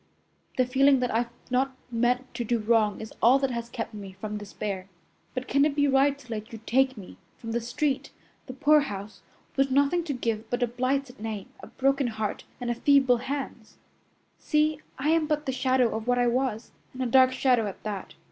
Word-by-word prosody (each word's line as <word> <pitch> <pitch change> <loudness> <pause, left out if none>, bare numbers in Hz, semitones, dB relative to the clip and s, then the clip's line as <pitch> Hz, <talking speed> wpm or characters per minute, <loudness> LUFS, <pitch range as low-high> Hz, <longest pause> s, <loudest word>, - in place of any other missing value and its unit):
The 255 - +4
feeling 270 +2 +4
that 250 - 0
I've 235 +1 +1 0.2
not 260 +1 +1 0.2
meant 245 +2 0
to 240 0 -3
do 235 +1 +1
wrong 215 -2 +2
is 220 - -8
all 245 +4 +6
that 270 -1 0
has 235 -1 -4
kept 230 -2 -5
me 200 -2 -8
from 210 +2 -6
despair. 200 -2 -5 0.5
But 255 0 -3
can 280 0 +3
it 295 -1 +1
be 285 0 +3
right 275 +1 +3
to 250 -4 -14
let 215 0 -5
you 225 - -8
take 260 +1 +2
me 190 -3 -11 0.2
from 230 - -7
the 235 +1 0
street, 265 +4 -1 0.4
the 255 - -6
poorhouse, 275 -8 +1 0.3
with 275 0 +2
nothing 285 +6 +2
to 295 - -2
give 225 -3 -2
but 245 0 0
a - - +2
blighted 255 +2 -2
name, 215 +1 -5
a - - -10
broken 275 0 +1
heart 220 -2 -3
and 240 -1 -2
feeble 265 -1 +4
hands! 260 -3 -5 0.6
See, 305 0 +1 0.2
I 285 +3 0
am 320 -1 +3
but 300 -1 -1
the 265 - 0
shadow 255 -3 +2
of 220 +1 -5
what 245 0 +3
I 245 - +3
was, 240 -2 -1 0.2
and 260 0 -3
a - - -1
dark 255 +1 +5
shadow 250 -4 +2
at 195 - -8
that. 205 -3 -5
250 Hz, 205 wpm, -27 LUFS, 225-275 Hz, 0.6 s, all